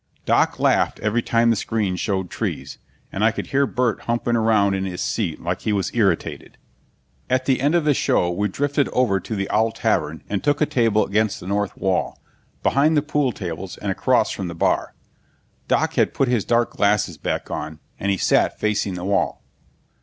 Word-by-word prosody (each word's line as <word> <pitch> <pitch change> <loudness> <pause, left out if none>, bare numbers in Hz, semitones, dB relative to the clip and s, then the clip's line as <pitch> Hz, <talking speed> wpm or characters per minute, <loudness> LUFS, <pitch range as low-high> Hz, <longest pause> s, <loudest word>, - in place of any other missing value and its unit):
Doc - - +2
laughed - - +2
every 110 +3 +1
time 115 0 +2
the - - +2
screen 105 -3 -1
showed 95 0 -2
trees, - - -4 0.3
and 100 - -2
I 110 - +6
could 115 - -4
hear 140 0 +3
Burt 125 -2 0
humping 120 0 0
around 110 -3 +3
in 95 0 -1
his 90 -2 -4
seat 90 -8 -2
like 90 +1 -3
he 110 - -1
was 100 -3 -1
irritated. - - -1 0.7
At 130 0 +1
the 130 -2 +1
end 145 +5 +2
of 170 - +3
the 150 - +4
show 90 -8 +1
we 100 +4 0
drifted 145 +6 0
over 110 -7 +2
to 110 - -5
the 100 -1 -2
Owl 110 +1 +2
Tavern - - -1
and 100 -1 -2
took 145 -1 +2
a 150 - +3
table 115 -6 +2
against 105 +1 0
the - - -11
north 100 +1 -2
wall, 95 -1 -1 0.4
behind 150 +3 +3
the 145 - +2
pool 150 -3 0
tables 90 -7 -6
and - - -3
across - - +2
from 95 - -4
the 85 - -6
bar. - - 0 0.7
Doc - - +1
had - - +1
put 135 - +2
his 120 -4 +1
dark 120 0 +2
glasses 100 -5 +1
back - - -3
on, 80 0 -5 0.2
and 100 - -1
he 100 - +1
sat - - +2
facing 105 -3 0
the 90 0 -5
wall. 100 +1 0
105 Hz, 200 wpm, -22 LUFS, 95-125 Hz, 0.7 s, I